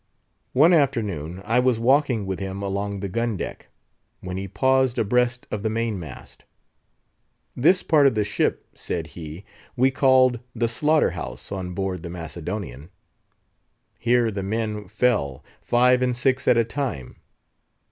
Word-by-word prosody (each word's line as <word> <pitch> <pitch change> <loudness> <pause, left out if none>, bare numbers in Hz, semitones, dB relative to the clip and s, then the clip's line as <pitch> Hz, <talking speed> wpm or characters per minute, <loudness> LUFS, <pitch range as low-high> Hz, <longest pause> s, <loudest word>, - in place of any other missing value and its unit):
One 155 +7 +6
afternoon, 100 - 0
I 115 +3 +2
was 125 -2 +2
walking 125 -3 +2
with 95 -1 -3
him 95 0 -5
along 100 0 -3
the 100 - -2
gun 115 +2 -1
deck, - - -6 0.5
when 90 0 -6
he 95 +1 -4
paused 130 +4 +2
abreast 125 +3 +1
of 105 - -3
the 110 - -1
main 115 -2 -2
mast. 80 -7 -11 1.1
"This 180 +9 +3
part 150 -4 +5
of 130 - +1
the 105 - +2
ship," - - -1
said 85 -2 -4
he, 80 +3 -9 0.3
"we 130 +2 +3
called 130 -2 +4 0.2
the 115 0 +1
slaughter 150 +7 +2
house - - -7
on 90 -2 -4
board 95 -2 -2
the 85 - -7
Macedonian. 85 - -6 1.1
Here 120 -1 +2
the 100 -1 -4
men 105 0 -3
fell, 105 - 0 0.2
five 125 +1 +3
and 125 -1 0
six 130 +1 0
at 120 - +5
a 115 - +4
time. 115 - -4
110 Hz, 150 wpm, -24 LUFS, 95-125 Hz, 1.1 s, One